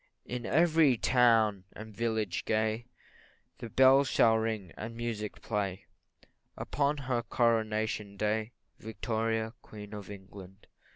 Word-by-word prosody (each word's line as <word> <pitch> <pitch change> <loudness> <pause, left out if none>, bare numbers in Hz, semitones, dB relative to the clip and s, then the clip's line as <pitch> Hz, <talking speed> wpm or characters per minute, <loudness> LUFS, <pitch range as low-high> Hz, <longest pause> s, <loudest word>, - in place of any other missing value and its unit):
In 120 -1 -5
every 160 -6 +4
town 110 -6 +3
and 110 -1 -10
village 110 -5 -1
gay, 110 +2 0 0.7
The 120 - -7
bells 135 +3 +5
shall 115 -2 +4
ring, 110 -5 -2
and 115 +2 -7
music 110 -3 -5
play, 100 -3 -3 0.7
Upon 145 +1 0
her 130 -4 -1
Coronation 110 -3 0
day, 110 +2 -1 0.3
Victoria, 110 +1 -2
Queen 105 -1 -11
of 105 -2 -8
England. 95 -1 -12
110 Hz, 115 wpm, -30 LUFS, 105-120 Hz, 0.7 s, bells